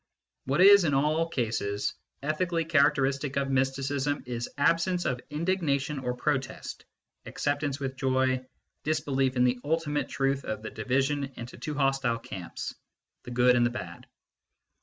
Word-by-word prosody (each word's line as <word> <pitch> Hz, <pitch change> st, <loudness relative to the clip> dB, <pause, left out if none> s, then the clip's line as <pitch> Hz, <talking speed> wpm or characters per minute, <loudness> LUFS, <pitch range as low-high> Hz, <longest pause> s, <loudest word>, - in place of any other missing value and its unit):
What 135 Hz, +6 st, +1 dB
is, 200 Hz, 0 st, +9 dB
in 145 Hz, -4 st, +2 dB
all 155 Hz, +4 st, +2 dB
cases, 110 Hz, -7 st, -1 dB, 0.3 s
ethically 165 Hz, +2 st, 0 dB
characteristic 140 Hz, -2 st, +2 dB
of 135 Hz, -1 st, 0 dB
mysticism 135 Hz, +2 st, 0 dB
is 120 Hz, -1 st, -4 dB
absence 170 Hz, +4 st, +2 dB
of 125 Hz, -1 st, -1 dB
indignation 150 Hz, -3 st, 0 dB
or 125 Hz, -1 st, -2 dB
protest, 130 Hz, 0 st, -3 dB, 0.4 s
acceptance 145 Hz, -1 st, -1 dB
with 135 Hz, -1 st, -4 dB
joy, 130 Hz, 0 st, +1 dB, 0.4 s
disbelief 140 Hz, -4 st, 0 dB
in 125 Hz, -, +3 dB
the 125 Hz, 0 st, +2 dB
ultimate 150 Hz, -1 st, -1 dB
truth 135 Hz, 0 st, 0 dB
of 110 Hz, -2 st, -4 dB
the 110 Hz, -, -5 dB
division 135 Hz, +5 st, 0 dB
into 120 Hz, +1 st, -8 dB
two 150 Hz, -, -5 dB
hostile 135 Hz, -4 st, +1 dB
camps, 95 Hz, -6 st, -6 dB, 0.5 s
the -, -, -7 dB
good 125 Hz, +1 st, +4 dB
and 120 Hz, -, +4 dB
the 120 Hz, -, +3 dB
bad. 90 Hz, -8 st, -7 dB
135 Hz, 140 wpm, -28 LUFS, 125-150 Hz, 0.5 s, is